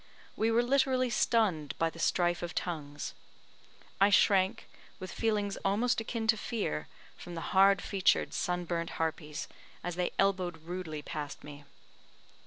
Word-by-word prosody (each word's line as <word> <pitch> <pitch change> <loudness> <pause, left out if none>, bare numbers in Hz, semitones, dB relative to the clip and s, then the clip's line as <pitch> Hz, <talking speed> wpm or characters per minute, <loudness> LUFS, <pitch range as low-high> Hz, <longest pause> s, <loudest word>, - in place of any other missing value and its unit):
We 220 - +1
were 230 +1 +3
literally 260 -1 +2
stunned 205 - +1
by 165 0 +1
the 165 - -12
strife 175 0 +1
of 175 0 -5
tongues. 150 -4 -4 0.9
I 200 +1 +6
shrank, 195 +1 +3 0.3
with 185 - -6
feelings 210 -3 0
almost 225 +5 +1
akin 225 0 -3
to 220 0 +4
fear, 80 - -3 0.3
from 175 - -9
the 165 - -5
hard 195 0 +5
featured, 195 -2 +2
sun 180 0 -1
burnt 170 -1 -2
harpies, 155 -2 -3 0.4
as 175 0 -4
they 180 - +1
elbowed 185 -3 +1
rudely 165 -3 -5
past 150 -1 -6
me. 145 -1 -10
185 Hz, 145 wpm, -31 LUFS, 165-215 Hz, 0.9 s, I